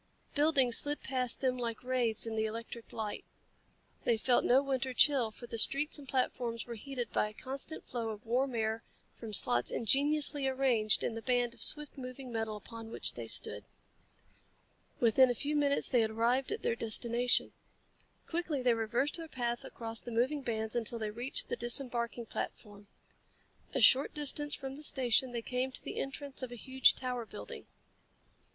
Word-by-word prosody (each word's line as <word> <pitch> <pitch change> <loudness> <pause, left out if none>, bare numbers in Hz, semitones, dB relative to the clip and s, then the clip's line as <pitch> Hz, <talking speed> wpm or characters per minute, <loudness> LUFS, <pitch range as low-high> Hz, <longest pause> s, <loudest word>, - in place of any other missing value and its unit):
Buildings 285 -5 +4
slid 290 0 -3
past 255 -3 -1
them 255 -2 0
like 230 -1 -3
wraiths 250 -4 0
in 225 -1 -4
the 220 0 +1
electric 230 +1 -7
light. 215 -2 -4 0.8
They 235 - +2
felt 245 +2 +3
no 265 +3 +4
winter 265 -2 -2
chill, 270 -6 +4
for 230 +3 -11
the 230 -1 -3
streets 295 +6 +4
and 280 - -12
platforms 240 -3 -1
were 240 - -6
heated 245 0 -5
by 210 - +1
a - - -14
constant 275 +6 -6
flow 235 -2 -3
of 215 0 -7
warm 250 +2 0
air 220 0 -1 0.3
from 225 -2 -8
slots 120 -11 +2
ingeniously 285 +3 +2
arranged 255 -5 +2
in - - -1
the 225 - -5
band 245 -1 +1
of - - -12
swift 300 -2 +1
moving 255 0 -7
metal 225 -2 -2
upon 225 +1 -10
which - - 0
they - - -7
stood. - - +1 1.4
Within 245 +2 +5
a 245 - 0
few 295 +5 -2
minutes 285 -1 +2
they 245 -3 +3
had 220 - +1
arrived 235 +4 +1
at - - -3
their - - +1
destination. 235 +2 +1 0.7
Quickly 325 -5 -2
they 245 -1 +4
reversed 235 +7 -1
their 330 -1 -6
path 240 -4 -3
across 225 -1 -5
the - - -8
moving 250 +6 0
bands 220 -3 -3
until 235 0 0
they 215 -2 -3
reached 240 +5 -1
the - - -2
disembarking 240 -1 -2
platform. 205 -2 -6 0.9
A - - +2
short 270 +2 +6
distance 295 0 +2
from 270 -1 -7
the 300 - -9
station 255 -2 +2
they 235 -1 -4
came 255 +2 -2
to - - -9
the - - -6
entrance 275 0 -5
of 255 -2 -5
a - - -6
huge 260 +3 +4
tower 250 -2 -3
building. 225 - -9
245 Hz, 180 wpm, -33 LUFS, 230-270 Hz, 1.4 s, short